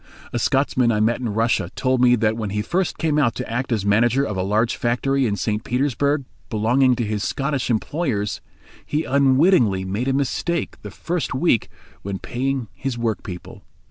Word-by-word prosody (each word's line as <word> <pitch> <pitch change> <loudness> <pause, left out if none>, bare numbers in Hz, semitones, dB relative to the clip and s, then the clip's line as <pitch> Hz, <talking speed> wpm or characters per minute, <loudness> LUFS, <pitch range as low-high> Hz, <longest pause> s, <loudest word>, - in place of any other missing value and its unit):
A 120 - 0
Scotsman 130 -1 +2
I 105 - +1
met 110 +2 +2
in 120 -3 -2
Russia 115 +3 +1
told 130 -1 +1
me 125 -1 +6
that 110 -1 +1
when 110 -2 -3
he 105 +1 -2
first 180 - -1
came 155 -2 +1
out 120 -6 +2
to - - -4
act 125 +3 -3
as 105 -4 0
manager 120 +6 +3
of 105 -7 -3
a 95 - -1
large 105 +5 +1
factory 130 +2 +1
in 100 - 0
St. 105 +1 -2
Petersburg, 140 +2 0 0.2
belonging 125 +4 +3
to 120 - -2
his 105 -1 -2
Scottish 140 -2 -1
employers, 115 -3 -1 0.4
he 150 +2 -1
unwittingly 135 - +3
made 100 +7 -2
a 135 - +2
mistake 140 +4 -1
the 105 - -7
first 165 - -3
week 130 -5 +2 0.3
when 100 0 -4
paying 130 +3 -2
his 135 -3 -4
workpeople. 105 -6 -4
120 Hz, 180 wpm, -22 LUFS, 110-135 Hz, 0.4 s, me